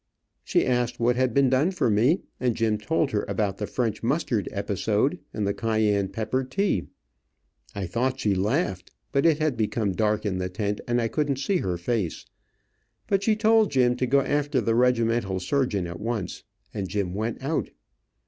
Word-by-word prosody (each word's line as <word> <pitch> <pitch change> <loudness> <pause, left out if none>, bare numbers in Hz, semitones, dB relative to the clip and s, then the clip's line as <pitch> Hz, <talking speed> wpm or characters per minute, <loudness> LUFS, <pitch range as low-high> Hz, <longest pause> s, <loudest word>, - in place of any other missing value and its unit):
She - - +2
asked 125 -1 0
what 120 +1 +2
had 130 0 +1
been 140 +3 +4
done 130 +6 +3
for 185 -9 0
me, 120 - +3 0.2
and 125 -3 +1
Jim 110 -2 +1
told 150 +4 0
her 105 - 0
about 100 -3 -1
the 105 - -2
French 120 -4 -2
mustard 120 -4 0
episode, 105 - 0
and 105 - -2
the 100 - 0
cayenne 105 -2 +1
pepper 110 +6 -2
tea. 130 - -1 0.9
I 100 -2 -3
thought 125 +8 -1
she 105 -5 +1
laughed, 95 - -1 0.2
but 140 +3 +3
it 160 -3 +4
had 155 -4 0
become 110 -2 0
dark 105 +2 0
in 95 -3 -1
the 90 0 -2
tent, 100 +2 -2
and 120 0 +1
I 115 - +1
couldn't 145 +2 0
see 185 +8 0
her 90 - -2
face, 95 -1 -2 0.8
but 195 -1 +1
she 215 +1 +2
told 220 0 +4
Jim 125 -2 +3
to 130 - 0
go 140 +3 +4
after 145 0 0
the 115 -1 +1
regimental 115 -5 +2
surgeon 100 -1 0
at 85 0 -6
once, 110 -3 -4 0.3
and 95 -3 -4
Jim 95 -2 -2
went 110 +5 -3
out. 150 +4 -1
115 Hz, 185 wpm, -25 LUFS, 105-135 Hz, 0.9 s, been